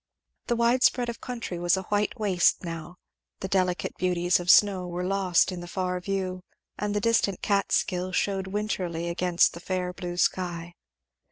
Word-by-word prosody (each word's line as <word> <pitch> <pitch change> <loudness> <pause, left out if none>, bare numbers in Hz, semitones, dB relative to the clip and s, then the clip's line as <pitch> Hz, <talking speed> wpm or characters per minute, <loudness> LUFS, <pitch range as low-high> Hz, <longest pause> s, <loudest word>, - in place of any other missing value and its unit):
The 240 - +1
wide 235 +2 +2
spread 245 -1 +3
of 235 - -6
country 230 -8 -5
was 175 +1 +2
a 190 - -3
white 210 +4 -1
waste 190 -4 +2
now; 165 0 -6 0.5
the 190 - -2
delicate 185 -2 0
beauties 180 -1 +1
of 175 - -7
the - - +8
snow 195 -3 +4
were 175 +1 -4
lost 190 -1 +2
in 180 - -5
the 175 - -8
far 180 0 -2
view; 185 -1 -3 0.3
and 210 0 -3
the - - +2
distant 215 -4 +1
Catskill 185 -2 0
shewed 190 0 -1
wintrily 185 -5 -3
against 175 0 +2
the 170 - -8
fair 180 0 -3
blue 175 -1 -6
sky. 175 -2 -1
185 Hz, 175 wpm, -26 LUFS, 175-200 Hz, 0.5 s, the